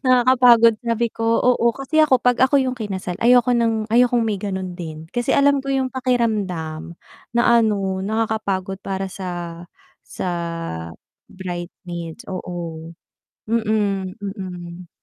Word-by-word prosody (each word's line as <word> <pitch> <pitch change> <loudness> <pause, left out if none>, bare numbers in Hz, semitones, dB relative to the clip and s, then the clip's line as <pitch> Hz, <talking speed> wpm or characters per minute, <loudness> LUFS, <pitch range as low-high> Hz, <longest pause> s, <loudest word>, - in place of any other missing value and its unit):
nakakapagod." 245 -3 +5
Sabi 230 0 +1
ko, 225 - -4 0.2
oo, 250 -1 +3
kasi 275 +3 +1
ako 280 -5 +5
pag 245 -1 +3
ako 265 +2 +5
yung 255 -1 -1
kinasal, 190 -5 -4
ayoko 245 +1 +5
ng 225 -2 +1
ayokong 240 -1 +4
may 215 -3 -1
ganun 190 -3 -4
din. 160 -2 -7
Kasi 240 0 0
alam 280 0 +4
ko 275 - -8
yung 265 -1 0
pakiramdam 200 -11 -1 0.4
na 235 - +4 0.2
ano 195 -3 0
nakakapagod 205 -3 -2
para 195 0 -2
sa 190 -2 -6 0.8
sa 170 - -6 0.2
bridesmaid 170 -2 -6
oo 170 -3 -6 0.6
mm. 195 -5 -3
205 Hz, 120 wpm, -21 LUFS, 180-240 Hz, 0.8 s, nakakapagod